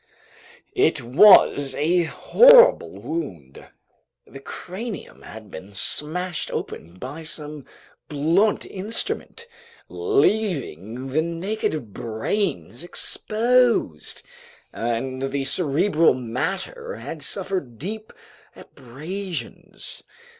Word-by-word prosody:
It -, -, +2 dB
was 140 Hz, -, +6 dB
a 170 Hz, +3 st, +2 dB
horrible -, -, +6 dB
wound. 90 Hz, -, -7 dB, 0.6 s
The 135 Hz, -, -12 dB
cranium 190 Hz, -, -7 dB
had 110 Hz, -2 st, -11 dB
been 95 Hz, +2 st, -10 dB
smashed 175 Hz, -, -1 dB
open 85 Hz, +3 st, -6 dB
by 135 Hz, -, -7 dB
some 150 Hz, -2 st, -6 dB, 0.4 s
blunt 165 Hz, +8 st, +2 dB
instrument, 220 Hz, -, -3 dB, 0.4 s
leaving 175 Hz, -, 0 dB
the 155 Hz, +4 st, +2 dB
naked 165 Hz, -, -3 dB
brains 120 Hz, -, -3 dB
exposed, 230 Hz, -, +1 dB, 0.5 s
and 120 Hz, +3 st, -3 dB
the 135 Hz, +1 st, -2 dB
cerebral 160 Hz, +2 st, +2 dB
matter 185 Hz, -, -4 dB
had -, -, -7 dB
suffered 145 Hz, -12 st, -3 dB
deep 215 Hz, -, -6 dB, 0.4 s
abrasions. 155 Hz, +3 st, -7 dB
155 Hz, 80 wpm, -23 LUFS, 130-200 Hz, 0.6 s, was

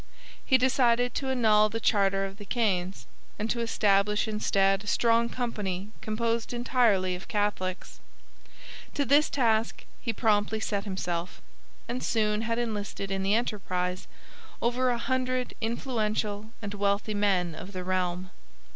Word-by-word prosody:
He 260 Hz, -, +4 dB
decided 245 Hz, -2 st, +2 dB
to 270 Hz, -, -2 dB
annul 215 Hz, -4 st, +4 dB
the 225 Hz, +2 st, -3 dB
charter 195 Hz, -3 st, +2 dB
of 195 Hz, 0 st, -8 dB
the 205 Hz, -, -10 dB
Caens 195 Hz, -6 st, 0 dB, 0.3 s
and 215 Hz, +1 st, -2 dB
to 240 Hz, -, -1 dB
establish 210 Hz, -2 st, +2 dB
instead 195 Hz, -2 st, +2 dB
a -, -, -12 dB
strong 230 Hz, +1 st, +3 dB
company 210 Hz, -6 st, -3 dB
composed 230 Hz, +2 st, -1 dB
entirely 235 Hz, -7 st, +2 dB
of 180 Hz, +1 st, -7 dB
Catholics. 205 Hz, -3 st, -2 dB, 1.0 s
To 285 Hz, -, +1 dB
this 285 Hz, +4 st, +4 dB
task 225 Hz, -4 st, +1 dB, 0.2 s
he 230 Hz, -, -1 dB
promptly 215 Hz, -1 st, +1 dB
set 205 Hz, -2 st, -2 dB
himself, 180 Hz, -3 st, -3 dB, 0.5 s
and 245 Hz, +2 st, -3 dB
soon 210 Hz, -1 st, +1 dB
had 230 Hz, 0 st, -1 dB
enlisted 205 Hz, -4 st, -3 dB
in 195 Hz, 0 st, -1 dB
the 195 Hz, +2 st, +2 dB
enterprise 185 Hz, -5 st, -2 dB, 0.5 s
over 250 Hz, +2 st, +1 dB
a 240 Hz, -, +1 dB
hundred 255 Hz, 0 st, -1 dB
influential 220 Hz, -3 st, -2 dB
and 205 Hz, 0 st, -4 dB
wealthy 200 Hz, +1 st, 0 dB
men 190 Hz, -5 st, +1 dB
of 185 Hz, +5 st, -8 dB
the 185 Hz, -2 st, -5 dB
realm. 185 Hz, 0 st, -1 dB
210 Hz, 140 wpm, -28 LUFS, 195-235 Hz, 1.0 s, He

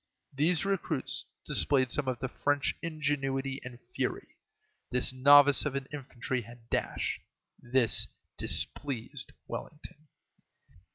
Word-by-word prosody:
These 160 Hz, +6 st, +2 dB
recruits 140 Hz, -8 st, -1 dB, 0.2 s
displayed 135 Hz, -3 st, +3 dB
some 145 Hz, -3 st, +1 dB
of 130 Hz, -2 st, 0 dB
the 130 Hz, -, -3 dB
French 145 Hz, +2 st, 0 dB
ingenuity 135 Hz, -4 st, -1 dB
and 125 Hz, -1 st, -8 dB, 0.2 s
fury. -, -, -2 dB, 0.6 s
This 125 Hz, +1 st, +2 dB
novice 140 Hz, +2 st, +7 dB
of 150 Hz, -2 st, -2 dB
an 135 Hz, -1 st, -2 dB
infantry 130 Hz, -3 st, -3 dB
had 120 Hz, 0 st, -14 dB
dash. -, -, -1 dB, 0.4 s
This 120 Hz, -2 st, +2 dB, 0.3 s
displeased 130 Hz, -4 st, -2 dB, 0.2 s
Wellington. 150 Hz, 0 st, -8 dB
135 Hz, 110 wpm, -31 LUFS, 130-145 Hz, 0.6 s, novice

